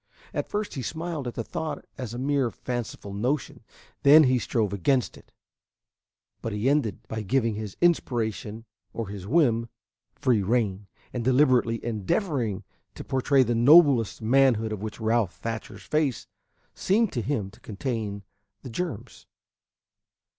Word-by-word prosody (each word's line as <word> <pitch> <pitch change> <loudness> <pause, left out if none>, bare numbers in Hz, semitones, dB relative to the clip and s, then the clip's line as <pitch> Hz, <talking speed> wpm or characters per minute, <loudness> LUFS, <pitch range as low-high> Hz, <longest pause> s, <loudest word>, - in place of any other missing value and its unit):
At - - -3
first 210 0 -3
he 135 - -4
smiled 160 +1 -4
at 120 - -5
the 115 - -3
thought 155 +7 -5
as 125 -5 -6
a 120 - -6
mere 135 -1 +1
fanciful 120 -5 -5
notion; 125 +8 -2 0.4
then 150 +3 +8
he 130 -2 +3
strove 110 -3 -1
against 125 +6 +1
it; - - -18 1.1
but 115 - -3
he 105 +4 -1
ended 120 -6 0
by 110 - -4
giving 115 +2 +1
his 105 -2 -6
inspiration, 115 -9 0 0.3
or 115 -4 -4
his 100 -2 -7
whim, 120 -5 +2 0.5
free 120 -5 +2
rein, 100 -2 0 0.3
and 120 - -2
deliberately 125 -3 +3
endeavoring 115 - -1 0.3
to - - -7
portray 135 +1 +2
the 120 -1 0
noblest 125 - +5
manhood 115 -2 +3
of 105 -2 -4
which 110 +1 -6
Ralph 110 -4 +1
Thatcher's 115 -1 -6
face 150 -5 0 0.5
seemed 215 +2 +1
to 120 - -1
him 110 -6 -2
to 110 - -19
contain 105 -2 -4 0.4
the 125 - -8
germs. 165 - -5
120 Hz, 145 wpm, -26 LUFS, 110-140 Hz, 1.1 s, then